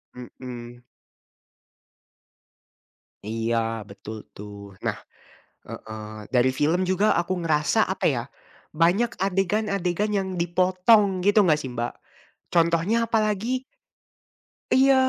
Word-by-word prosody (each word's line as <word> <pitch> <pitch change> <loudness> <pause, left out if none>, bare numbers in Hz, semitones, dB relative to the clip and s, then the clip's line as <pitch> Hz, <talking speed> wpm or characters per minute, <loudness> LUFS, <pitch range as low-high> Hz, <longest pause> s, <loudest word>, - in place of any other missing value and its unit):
Mhm. 120 -1 -9 2.4
Iya, 115 0 -1
betul 100 +2 -8 0.2
tuh. 100 -1 -10
Nah - - -1 0.7
heeh, 110 0 -8
dari 130 0 +3
film 160 +7 +1
juga 190 +3 +2
aku 175 +2 0
ngerasa 160 +6 +2
apa 190 0 -2
ya, 125 -6 +2 0.5
banyak 180 +9 +3
adegan-adegan 195 0 0
yang 195 -2 0
dipotong, 185 +3 +3
gitu 205 +1 +5
nggak 160 -6 +3
sih 130 -4 -6
Mbak. 120 0 -3 0.6
Contohnya 170 +7 +3
apalagi 220 +3 0 1.1
Iya, 270 +1 +6
170 Hz, 95 wpm, -25 LUFS, 120-200 Hz, 2.4 s, Iya